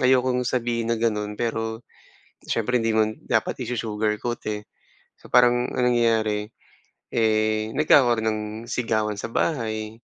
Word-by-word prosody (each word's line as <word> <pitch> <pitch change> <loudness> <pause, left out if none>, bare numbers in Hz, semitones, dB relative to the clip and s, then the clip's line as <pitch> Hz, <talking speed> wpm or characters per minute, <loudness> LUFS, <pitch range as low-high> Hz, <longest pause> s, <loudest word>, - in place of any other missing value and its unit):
ayokong 130 0 +3
sabihin 120 -2 -1
na 115 - +1
gano'n 105 -2 -1
pero 115 0 -3 0.6
syempre 120 +2 +1
hindi 115 -1 0
mo 110 -1 +3 0.2
dapat - - 0
i-su-sugar 110 -3 -1
coat, 120 -1 -2
eh. 105 -1 -3 0.5
So - - -17
parang 120 0 +4
ang 125 -1 +1
nangyayari, 110 -2 +1 0.6
eh, 110 -1 +1
nagkakaron 125 -7 +4
ng 110 -1 0 0.3
sigawan 110 -3 -1
sa - - -5
bahay. 110 -5 -2
115 Hz, 130 wpm, -24 LUFS, 110-120 Hz, 0.6 s, parang